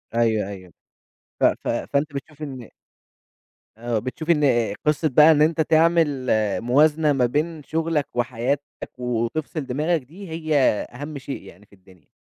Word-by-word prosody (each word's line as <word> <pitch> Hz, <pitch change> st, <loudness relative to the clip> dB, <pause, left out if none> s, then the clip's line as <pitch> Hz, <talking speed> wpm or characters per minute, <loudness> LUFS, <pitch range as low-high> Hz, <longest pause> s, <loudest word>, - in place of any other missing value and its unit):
أيوه 110 Hz, -4 st, +2 dB
أيوه. 95 Hz, -4 st, -10 dB, 0.7 s
ف -, -, +2 dB
ف -, -, +1 dB
فأنت 145 Hz, +1 st, -1 dB
بتشوف 150 Hz, +2 st, -8 dB
إن 130 Hz, -5 st, -7 dB, 1.1 s
آآ 115 Hz, -1 st, -1 dB
بتشوف 145 Hz, +8 st, -6 dB
إن 130 Hz, -9 st, +3 dB
قصّة 150 Hz, +1 st, +2 dB
بقى 150 Hz, +5 st, +7 dB
إن 150 Hz, -, +3 dB
أنت 160 Hz, +1 st, +3 dB
تعمل 160 Hz, -4 st, +2 dB, 0.3 s
موازنة 150 Hz, +5 st, +3 dB
ما 130 Hz, -3 st, +2 dB
بين 150 Hz, +5 st, -2 dB
شغلك 160 Hz, -1 st, -1 dB
وحياتك، 125 Hz, +3 st, -1 dB, 0.3 s
وتفصل 125 Hz, +5 st, -2 dB
دماغك 150 Hz, +6 st, 0 dB
دي، 170 Hz, +8 st, -12 dB
هي 155 Hz, -1 st, -2 dB, 0.4 s
أهم 145 Hz, +3 st, -7 dB
شيء 135 Hz, +1 st, -6 dB
يعني 100 Hz, +4 st, -15 dB
في 100 Hz, -, -21 dB
الدنيا. 95 Hz, -3 st, -22 dB
145 Hz, 140 wpm, -23 LUFS, 120-155 Hz, 1.1 s, بقى